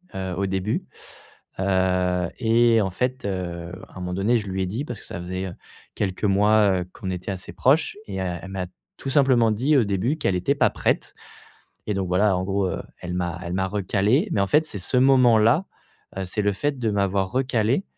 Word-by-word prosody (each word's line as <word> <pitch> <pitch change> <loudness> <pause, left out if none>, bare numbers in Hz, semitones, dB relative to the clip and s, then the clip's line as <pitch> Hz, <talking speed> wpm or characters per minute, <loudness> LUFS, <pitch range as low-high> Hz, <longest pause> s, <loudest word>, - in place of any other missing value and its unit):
heu, 95 -1 -3
au 100 - 0
début, 95 +3 -1 0.7
heu 90 -2 +1
et 115 -1 +4
en 95 - 0
fait, 125 +4 -2
heu, 90 -3 -4 0.2
à - - -19
un - - -6
moment 90 0 -3
donné, 110 +5 +2
je 105 - -7
lui 95 0 -2
ai - - -2
dit 115 +9 -3
parce 120 -7 -6
que - - -12
ça - - -6
faisait, 95 +2 -4
heu, - - -8 0.4
quelques 95 0 -3
mois, 100 -1 +4
heu, - - -5
qu'on 95 - -6
était 90 +2 -5
assez 95 -1 -7
proches 150 +8 +2
et - - -6
elle 90 0 -4
m'a 95 -1 -3 0.3
tout 135 - -5
simplement 130 -6 +4
dit 135 +7 +2
au 120 - +4
début 100 +10 0
qu'elle 95 - 0
était 115 +11 +1
pas - - +3
prête - - -1 0.7
et 105 - 0
donc 95 -2 -1
voilà, 95 +2 +3
en 90 - -1
gros, 100 0 0
heu, - - -3 0.2
elle 90 0 -5
m'a 90 -1 -2
elle 85 +1 -4
m'a 95 0 0
recalé 105 - +1
mais 100 - +1
en 100 - +1
fait, 155 +6 +3
c'est 100 - -5
ce 125 +8 0
moment-là. 125 - +5 0.6
C'est 105 +4 -2
le 100 -1 +2
fait 145 +4 -2
de 110 -3 0
m'avoir 100 -1 0
recalé 125 - +1
100 Hz, 210 wpm, -24 LUFS, 95-120 Hz, 0.7 s, moment-là